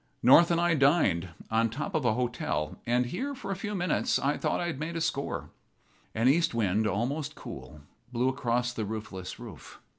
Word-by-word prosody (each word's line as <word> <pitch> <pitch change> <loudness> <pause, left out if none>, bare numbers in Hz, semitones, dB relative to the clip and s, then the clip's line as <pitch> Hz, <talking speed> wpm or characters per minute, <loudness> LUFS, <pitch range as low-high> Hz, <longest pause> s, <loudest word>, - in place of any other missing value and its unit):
North 165 +7 +8
and 170 -1 +2
I 175 0 +3
dined 135 - +3 0.2
on 115 +1 +3
the 115 - -9
top 150 +8 -4
of 155 -5 0
a 115 - +4
hotel; 120 -10 -2
and 125 +1 +2
here, 275 - -3
for 195 -6 -6
a - - -1
few 205 +2 -4
minutes, 180 -3 +1
I 140 +2 +1
thought - - -1
I 175 - -1
had 170 -5 -3
made 165 +2 -4
a - - -1
score. 160 -4 -2 0.6
An 115 +3 +2
east 155 -1 +3
wind, 110 -1 +1
almost 125 - -2
cool, 75 - -9 0.3
blew 125 +1 +1
across 125 -2 0
the 115 - -3
roofless 100 -3 -6
roof. - - -11
130 Hz, 200 wpm, -29 LUFS, 115-165 Hz, 0.6 s, North